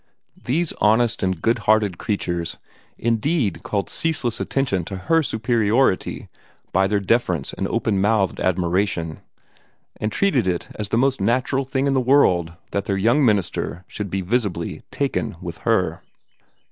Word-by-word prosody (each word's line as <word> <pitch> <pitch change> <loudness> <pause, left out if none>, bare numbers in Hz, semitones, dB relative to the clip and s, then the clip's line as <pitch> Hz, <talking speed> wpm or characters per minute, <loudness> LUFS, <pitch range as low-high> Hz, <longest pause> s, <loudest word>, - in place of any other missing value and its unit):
These 160 +6 0
honest 110 +2 +3
and 95 -3 0
good 115 +6 +1
hearted 105 -4 +3
creatures 85 -5 -2 0.4
indeed 115 - 0
called 100 -2 -2
ceaseless 150 -8 -1
attention 125 -10 0
to 95 - -6
her 165 - +2
superiority 115 -3 +1 0.4
by 95 +1 +3
their 100 +1 +1
deference 95 - 0
and 95 - -2
open 110 -3 0
mouthed 105 -1 +1
admiration, 90 -2 0 0.8
and 110 - -2
treated 135 - +1
it 90 -2 -2
as 105 -2 -5
the 110 - +1
most 135 -2 +2
natural 130 +5 +1
thing 135 +1 -1
in 140 - +2
the 130 - +2
world 95 - +3 0.2
that 100 0 -1
their 100 -3 0
young 120 +9 +3
minister 95 -5 0
should 105 -2 -5
be 95 +2 -2
visibly 95 -4 -1
"taken" - - -2
with - - -7
her. - - +1
105 Hz, 145 wpm, -22 LUFS, 95-125 Hz, 0.8 s, honest